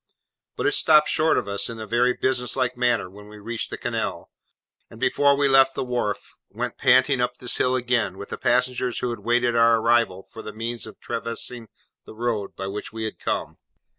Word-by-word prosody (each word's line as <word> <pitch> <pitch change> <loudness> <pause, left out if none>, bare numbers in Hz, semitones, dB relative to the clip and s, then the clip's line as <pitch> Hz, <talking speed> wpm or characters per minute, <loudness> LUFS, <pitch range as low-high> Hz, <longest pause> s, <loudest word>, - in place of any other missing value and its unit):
But - - -3
it 405 - +3
stopped 150 - +5
short 160 +1 +2
of - - -1
us 100 0 0
in 115 -1 -7
a 110 - -5
very 120 +3 +2
business 125 -1 -1
like 130 -1 0
manner 120 -6 +1
when 105 +3 -14
we 105 0 -12
reached 115 +2 -5
the - - -5
canal: - - -3 0.6
and, - - -13
before 140 0 +3
we 140 0 +3
left 135 0 +5
the 135 - -2
wharf, 120 -5 -3
went - - -5
panting 130 0 +4
up 125 0 -1
this 125 - -2
hill 125 0 +2
again, 120 -6 0
with 100 - -8
the - - -5
passengers 125 0 +1
who 125 - -2
had 115 - -5
waited 120 +2 +1
our 115 0 +5
arrival 115 -4 +1
for 110 - -9
the 110 - -8
means 115 +1 -4
of 110 - -12
traversing 115 0 -3 0.4
the - - -12
road 110 -3 -2
by 95 - -5
which 100 +2 -5
we 110 0 -5
had 110 - -5
come. - - -3
120 Hz, 210 wpm, -24 LUFS, 110-125 Hz, 0.6 s, stopped